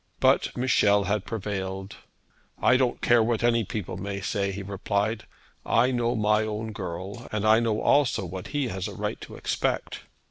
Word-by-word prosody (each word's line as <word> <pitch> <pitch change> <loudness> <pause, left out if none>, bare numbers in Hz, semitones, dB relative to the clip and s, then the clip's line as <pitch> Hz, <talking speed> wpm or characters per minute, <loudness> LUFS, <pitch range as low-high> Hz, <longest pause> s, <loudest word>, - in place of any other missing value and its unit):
But - - +3
Michel 105 -5 +3
had 100 +1 -1
prevailed. 95 -2 -4 0.6
'I 130 - +4
don't 130 -2 0
care 120 -1 +5
what 115 0 0
any 115 -1 +3
people 100 -4 -5
may 100 +1 -4
say,' 100 0 -1
he 100 +1 -5
replied. 100 +2 -2 0.4
'I 125 +3 +3
know 120 -1 0
my 105 -1 +3
own 110 0 -3
girl; 95 +3 -6
and 110 -1 -1
I 110 +1 +6
know 115 -2 0
also 140 -9 +3
what 90 +2 -6
he 145 -3 -1
has 95 +2 -3
a 100 - -8
right - - -3
to - - -9
expect.' - - -2
105 Hz, 175 wpm, -26 LUFS, 100-115 Hz, 0.6 s, I